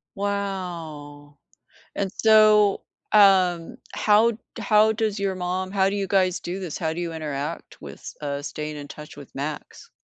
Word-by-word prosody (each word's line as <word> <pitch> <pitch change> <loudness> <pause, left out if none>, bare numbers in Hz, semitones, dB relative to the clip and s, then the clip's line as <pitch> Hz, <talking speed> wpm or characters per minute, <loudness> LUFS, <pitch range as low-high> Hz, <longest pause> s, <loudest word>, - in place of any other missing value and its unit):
Wow, 170 -8 -5 0.6
and, 195 -1 -1
so, 215 -2 +5 0.3
um, 185 -5 +4 0.2
how 215 +2 +4
d 220 - -9 0.2
how 215 0 +4
does 215 -2 -1
your 195 -1 -1
mom 185 +1 -3
how 195 -1 +2
do 200 - -3
you 195 -1 -2
guys 185 -2 +2
do 180 +3 -5
this? 175 -5 -5
How 160 -2 -2
do 170 - -5
you 170 -1 -3
interact 150 0 -5
with, - - -10
uh, 140 -1 -3
staying 150 +1 -5
in 145 0 -8
touch 150 +1 -11
with 140 - -12
Max? 145 +2 -6
185 Hz, 160 wpm, -24 LUFS, 155-200 Hz, 0.6 s, so